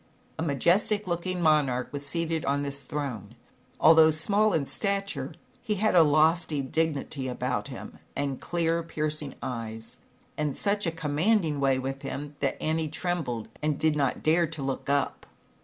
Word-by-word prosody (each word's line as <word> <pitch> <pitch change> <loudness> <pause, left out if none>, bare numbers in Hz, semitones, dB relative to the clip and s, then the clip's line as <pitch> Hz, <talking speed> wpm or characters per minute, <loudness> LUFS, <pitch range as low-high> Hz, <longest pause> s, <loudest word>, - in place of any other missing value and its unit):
A - - 0
majestic 180 - +2
looking 180 0 -2
monarch 140 -6 +2
was 145 0 -2
seated 165 +2 -1
on 140 +1 0
this 140 0 -3
throne. 125 -6 -5 0.4
Although 160 0 +7
small 200 +8 +3
in 155 -6 +1
stature, 200 +4 -2 0.3
he 210 - -1
had 215 +2 +1
a 175 - +7
lofty 155 -1 +3
dignity 145 -1 -1
about 125 -4 -2
him, - - -9 0.2
and 140 -2 -2
clear, 170 -1 0
piercing 155 -3 -2
eyes, 115 -2 -5 0.4
and 150 -2 -1
such 205 -2 +1
a - - +1
commanding 160 +1 +1
way 135 -1 +3
with 135 +1 -4
him, 145 +1 -6
that 140 - -1
Annie 160 0 0
trembled 160 -8 -2
and 150 -1 0
did 155 -1 +2
not 140 -3 0
dare 165 +2 +3
to 155 -2 -6
look 135 0 -3
up. 140 -1 0
155 Hz, 155 wpm, -27 LUFS, 140-170 Hz, 0.4 s, Although